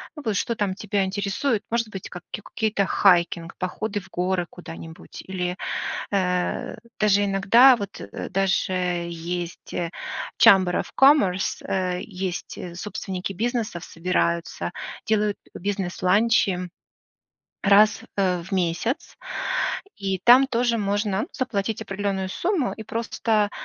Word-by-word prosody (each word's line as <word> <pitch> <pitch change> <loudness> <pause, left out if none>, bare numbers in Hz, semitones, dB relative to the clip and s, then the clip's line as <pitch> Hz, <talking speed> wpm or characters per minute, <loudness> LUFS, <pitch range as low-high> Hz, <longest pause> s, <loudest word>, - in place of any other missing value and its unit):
ну, 300 - -8
вот 215 -2 0
что 235 - -1
там 205 -3 0
тебя 205 -1 -1
интересует, 205 +5 -1
может 230 -1 0
быть, 195 -3 -7
ка 175 - -8
какие-то 210 -1 -1
хайкинг, 170 -3 +3
походы 205 +3 -2
в - - -17
горы 180 0 -1
куда-нибудь, 165 -2 -10
или, 180 -1 -3 0.6
э, 180 0 0 0.2
даже 205 -1 +4
иногда 200 +7 +6
вот, 200 -4 -6
э, - - -6
даже 195 0 +1 0.4
есть, 170 +1 -5
э, 170 -2 -2 0.5
Сhamber 185 -2 +6
of - - -13
commerce, 240 -10 +4
э, 180 -1 -1
есть, 185 -1 -5
э, 175 -1 -7
собственники 190 -1 -4
бизнесов 225 -4 -2
собираются, 170 0 -1 0.4
делают 210 -1 +1 0.2
бизнес-ланчи 190 0 +1 0.9
раз 205 +1 +5
в 185 -2 0
месяц. 180 +6 -1 0.8
И 195 -2 -2
там 250 +3 +8
тоже 240 -2 +1
можно 205 0 0
заплатить 225 -5 -2
определенную 195 -1 -2
сумму 340 - 0
и 220 - -9
просто 225 -1 0
195 Hz, 120 wpm, -24 LUFS, 180-215 Hz, 0.9 s, там